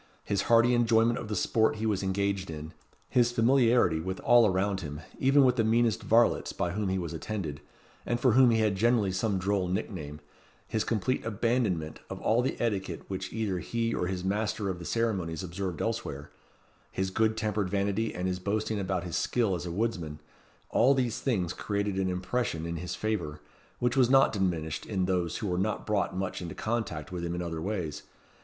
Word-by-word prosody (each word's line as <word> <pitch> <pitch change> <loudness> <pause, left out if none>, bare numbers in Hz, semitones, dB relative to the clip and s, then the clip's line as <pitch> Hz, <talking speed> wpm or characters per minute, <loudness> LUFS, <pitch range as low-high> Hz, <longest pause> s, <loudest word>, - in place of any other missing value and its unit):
His 100 -1 0
hearty 120 +1 +6
enjoyment 115 0 +3
of 110 - -6
the 105 - -3
sport 110 +4 +2
he 110 +1 -3
was 105 -3 +1
engaged 100 0 -1
in; 80 0 -7 0.3
his 120 -1 +3
familiarity 120 -7 +3
with 95 +3 -4
all 120 -1 +6
around 95 0 0
him, 75 -2 -6 0.2
even 135 +1 +5
with 125 0 +3
the 115 - +3
meanest 115 -1 +2
varlets 115 +1 +3
by 85 - -1
whom 100 +1 -1
he 95 - 0
was 85 -3 -4
attended, 80 -5 -4 0.4
and 120 - -1
for 125 - +4
whom 125 +2 +6
he 115 - +3
had 105 -2 +2
generally 110 -1 +2
some 95 +2 0
droll 95 0 0
nickname; 90 -6 -4 0.5
his 110 - 0
complete 115 +3 -1
abandonment 105 -8 -1
of - - -6
all 115 +2 +2
the 130 - -2
etiquette 100 -5 -2
which 95 -1 -4
either 105 -5 -1
he 115 +5 -1
or 90 - -1
his 90 -1 -3
master 105 +1 -1
of 90 -2 -3
the 85 - -8
ceremonies 95 -8 -1
observed 90 -1 -4
elsewhere; 110 -12 -4 0.6
his 95 0 -2
good 110 +2 +1
tempered 105 -3 -1
vanity 100 +3 0
and 90 0 -3
boasting 105 +1 -1
about 95 -2 -1
his 85 -3 -4
skill 115 -6 +1
as 90 0 -3
a - - -4
woodsman, 85 -7 -2 0.5
all 135 +4 +4
these 125 -4 0
things 95 -10 0
created 100 -1 -2
an 95 -1 +1
impression 90 -2 -2
in 85 0 -3
his 90 +2 -4
favour, 100 -9 -2 0.4
which 120 +1 0
was 130 -3 +4
not 135 0 +5
diminished 85 -6 -1
in 95 -4 0
those 90 -3 0
who 105 - -3
were 90 -1 0
not 105 +2 -1
brought 100 -3 0
much 95 0 -3
into 85 -3 -6
contact 110 -10 -3
with 90 -2 -4
him 85 0 -2
in 90 - -3
other 80 -2 -4
ways. 85 -7 -3
100 Hz, 195 wpm, -29 LUFS, 90-115 Hz, 0.6 s, hearty